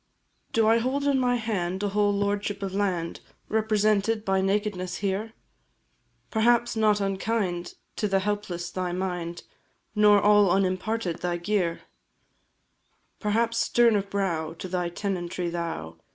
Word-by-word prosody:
Do 225 -1 +3
I 225 +1 +5
hold 260 +4 -1
in 280 -2 +2
my 250 -1 +2
hand 200 -5 -2
a 205 - +1
whole 205 0 +2
lordship 205 0 -1
of 195 -1 -3
land, 185 -4 -1 0.3
Represented 215 0 +1
by 190 0 +2
nakedness, 195 -2 -1
here? 200 +4 -2 1.0
Perhaps 235 +1 +3
not 215 -2 +3
unkind 195 -3 -2 0.2
to 210 - 0
the 195 -1 +2
helpless 190 -4 -3
thy 180 -1 -2
mind, 175 -2 -3 0.5
Nor 210 -1 +6
all 205 -1 +5
unimparted 190 0 0
thy 175 -1 -1
gear; 175 -2 -1 1.4
Perhaps 230 +2 +1
stern 235 -2 +4
of 200 -1 -1
brow 170 -6 -1
to 170 - -7
thy 180 -1 -1
tenantry 175 -2 -3
thou! 165 - -4
200 Hz, 135 wpm, -26 LUFS, 180-215 Hz, 1.4 s, Nor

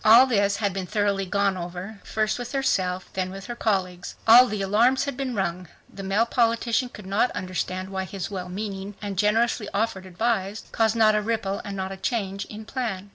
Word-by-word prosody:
All 230 +4 +9
this 200 -5 +2
had 205 -3 -1
been 190 -1 -4
thoroughly 200 -2 0
gone 200 0 +1
over, 180 +4 -6
first 215 +1 -1
with 245 +3 -6
herself, 185 -9 0
then 185 -1 -1
with 195 +1 -8
her 240 - -5
colleagues. 185 -6 -1
All 245 +3 +9
the 210 -3 -2
"alarms" 235 +8 +3
had 280 -2 -3
been 260 -2 -3
rung. 180 -2 -2 0.3
The 195 - -7
male 195 +4 +2
politician 235 +1 +1
could 210 -4 -11
not 200 +6 +2
understand 185 0 -3
why 190 -1 -3
his 190 -1 -5
wellmeaning 195 +1 -5
and 200 -2 -4
generously 210 +2 +2
offered 200 -3 -1
advice 205 +1 -1
caused 225 0 +2
not 220 -1 +5
a 210 - +2
ripple 210 -3 -2
and 200 -1 -6
not 190 0 -3
a 195 - -6
change 200 -2 -2
in 215 +1 -9
plan. 215 -6 -4
200 Hz, 195 wpm, -25 LUFS, 190-225 Hz, 0.3 s, All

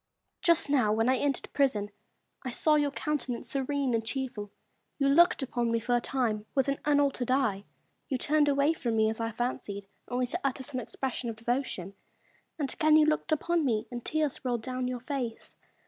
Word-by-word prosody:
Lady - - -55
Lisle. - - -53
Just 335 -3 +4
now, 250 -7 +3
when 225 +3 +2
I 260 - +3
entered 280 0 0
the - - -10
prison, 215 -8 +1 0.5
I 260 - -4
saw 305 +5 +2
your 295 -1 +3
countenance 280 -4 -3
serene 275 -1 0
and 225 -1 +1
cheerful; 225 -3 -4 0.5
you 275 - +2
looked 315 +1 +5
upon 240 -2 -1
me 230 - +2
for 245 +2 -1
a 240 - +2
time 225 -5 -1
with 270 -1 +2
an 275 0 0
unaltered 285 -4 +2
eye; 225 -7 +1 0.4
you 265 - 0
turned 295 +2 +2
away 280 +3 +3
from 240 -8 -2
me, 220 0 +3
as 220 - -5
I 225 0 -1
fancied, 215 -4 -3 0.2
only 250 +1 0
to 315 +9 -3
utter 265 -1 -1
some 260 -2 -5
expressions 250 0 -3
of 225 - -4
devotion; 230 -5 -2 0.6
and 285 -4 -1
again 310 -1 +5
you 310 - +6
looked 310 +1 0
upon 335 +2 +1
me, 225 -6 +1
and 240 -1 -5
tears 305 -3 -1
rolled 240 -3 -1
down 255 0 -2
your 250 -1 -3
face. 250 -4 -4
255 Hz, 205 wpm, -29 LUFS, 230-285 Hz, 0.6 s, you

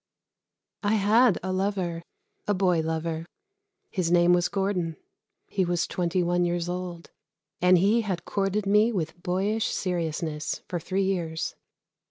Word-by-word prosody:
I 210 0 +2
had 215 +1 +4
a 185 0 -2
lover 185 -3 -1 0.5
a 205 - +2
boy 185 -3 +2
lover. 160 +1 -2 0.6
His 180 -4 0
name 175 0 +5
was 175 0 +2
Gordon. 190 -5 -1 0.5
He 190 - 0
was 175 -1 0
twenty 180 0 0
one 175 +1 +1
years 175 0 -1
old, 175 -1 -5 0.5
and 180 0 +6
he 205 +6 +3
had 185 -5 -3
courted 200 +1 -1
me 210 +3 +4
with 175 -4 -3
boyish 200 +4 0
seriousness 160 -4 -2
for 175 - -3
three 190 +4 -1
years. 170 -4 -2
180 Hz, 140 wpm, -27 LUFS, 170-195 Hz, 0.6 s, and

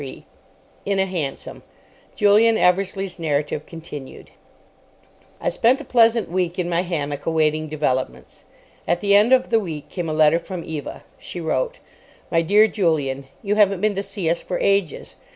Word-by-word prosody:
CHAPTER 135 -2 -9 0.6
23 200 - -2
IN 195 - 0
A 190 - +3
HANSOM 165 -8 -5 0.5
(Julian 215 +2 +4
Eversleigh's 190 0 0
narrative 150 -1 -2
continued) 155 -5 -10 1.1
I - - 0
spent 245 +3 +2
a - - -7
pleasant 230 -2 +3
week 180 0 -2
in 180 -2 -1
my 175 0 +1
hammock 145 -5 -4
awaiting 155 -1 +1
developments. 130 - -3 0.4
At 175 +1 +1
the 200 -1 +2
end 210 +4 +5
of 260 -1 +3
the 225 - +4
week 160 -7 -6
came 175 -3 -4
a - - -2
letter 155 +1 +4
from 180 -1 -7
Eva. 150 -3 -7 0.2
She 180 - -8
wrote:— 475 - -1 0.5
My 165 - +3
Dear 205 +6 +5
Julian,—You 155 - -1
haven't 200 -3 +3
been 215 0 +2
to 195 - -2
see 200 -3 -5
us 170 +1 0
for 180 - -3
ages. 195 -6 -1
175 Hz, 165 wpm, -22 LUFS, 155-200 Hz, 1.1 s, end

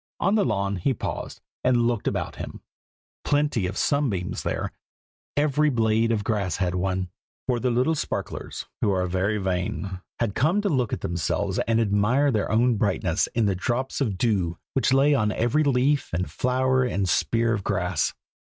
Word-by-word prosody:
On 195 - +2
the 215 -2 +3
lawn 100 - 0
he 125 +9 0
paused, - - -5 0.2
and 125 -2 +3
looked 120 -3 0
about - - -2
him. - - -7 0.6
Plenty 145 -9 +1
of 95 - -5
sunbeams 120 -12 0
there; - - -2 0.7
every 150 +1 +3
blade 115 -2 +2
of 105 -3 0
grass 100 -4 -1
had 90 -2 0
one, 90 0 -1 0.4
for 125 -2 0
the 125 - +1
little 125 +7 +2
sparklers, 155 - -4 0.2
who - - +2
are 95 -2 +1
very 95 +4 0
vain, 95 0 -2 0.2
had 115 -4 0
come 160 - +2
to 205 - 0
look 130 - +1
at - - -3
themselves 95 +4 -1
and 115 0 +3
admire 115 +7 +2
their 105 -5 0
own 115 +1 +3
brightness 95 -5 +1
in 115 -2 +3
the 100 - +2
drops 120 +9 -2
of 105 -8 0
dew 90 -7 0 0.2
which 135 - +2
lay 135 +2 +5
on 110 -6 +2
every 120 +8 +1
leaf 140 +1 +2
and 90 +3 -2
flower 130 +1 +1
and 100 -6 0
spear 115 +6 +2
of 105 -3 -2
grass. 90 -5 0
115 Hz, 175 wpm, -25 LUFS, 95-130 Hz, 0.7 s, lay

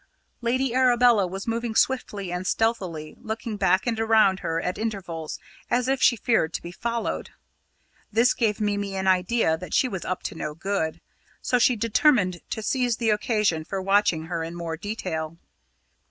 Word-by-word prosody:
Lady 250 +1 0
Arabella 245 -5 +4
was 195 +2 -6
moving 230 0 -2
swiftly 205 -9 0
and 180 +1 -3
stealthily, 185 -9 -1
looking 220 0 -4
back 190 -1 +2
and 230 -2 -1
around 220 -4 +4
her 165 -2 -2
at 180 +2 -3
intervals, 185 -8 -4 0.3
as 245 +1 +1
if 270 -1 0
she 245 - +5
feared 215 -7 +1
to - - -3
be 170 - -7
followed. 230 +5 -3 0.8
This 230 +4 +4
gave 220 -3 0
Mimi 205 -2 -1
an 190 0 -2
idea 185 -2 +2
that 180 - -4
she 260 - +3
was 190 -7 -5
up 185 - -3
to - - -4
no 150 -2 -5
good, 170 -2 -2 0.4
so 250 - +1
she 250 +1 +4
determined 210 - +2
to 220 - -4
seize 245 -1 +1
the 225 -2 +1
occasion 210 -6 +1
for 195 +4 -4
watching 195 -4 +2
her 165 0 -3
in 165 +1 -6
more 170 -1 -4
detail. 165 -4 -4
205 Hz, 170 wpm, -25 LUFS, 180-230 Hz, 0.8 s, she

